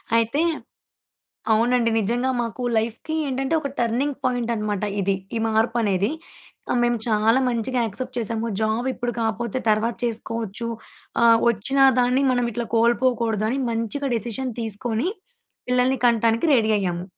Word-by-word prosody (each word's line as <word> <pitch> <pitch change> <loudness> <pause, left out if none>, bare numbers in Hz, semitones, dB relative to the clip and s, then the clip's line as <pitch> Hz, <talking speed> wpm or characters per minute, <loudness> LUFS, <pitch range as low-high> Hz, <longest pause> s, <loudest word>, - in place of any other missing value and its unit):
అయితే 230 +6 +2 1.1
అవునండి. 235 +1 +2
నిజ్జంగా 240 +5 0
మాకు 235 +2 -5 0.2
లైఫ్‌కి 230 +7 -2
ఏంటంటే, 270 +3 -2
ఒక 280 - -3
టర్నింగ్ 250 +5 0
పాయింటనమాట 230 -5 -1 0.2
ఇది. 195 +1 +1 0.2
ఈ - - +1
మార్పనేది. 220 -2 +1 0.6
ఆహ్, 245 - +1
మేము 240 0 +2
చాలా 220 +3 +3
మంచిగా 245 +1 -1
యాక్సెప్ట్ 250 +4 -5
చేశాము. 225 0 -2
జాబిప్పుడు 240 +2 -1
కాపోతే 230 +2 -2
తర్వాత 220 +2 +1
చేసుకోవచ్చు, 230 -1 -4 0.6
ఆహ్, 230 -1 +7
ఒచ్చిన 270 +6 -2 0.2
దాన్ని 250 +2 +2
మనమిట్లా 240 -2 -1
కోల్పోకూడదని 235 0 +1
మంచిగా 230 +5 -2
డెసిషన్ 240 +3 -3
తీసుకోని, 225 - -1 0.6
పిల్లలని 250 +1 +2
కంటానికి 230 +4 +2
రెడీ 220 -3 +2
అయ్యాము. 175 -2 -2
235 Hz, 120 wpm, -23 LUFS, 220-250 Hz, 1.1 s, ఆహ్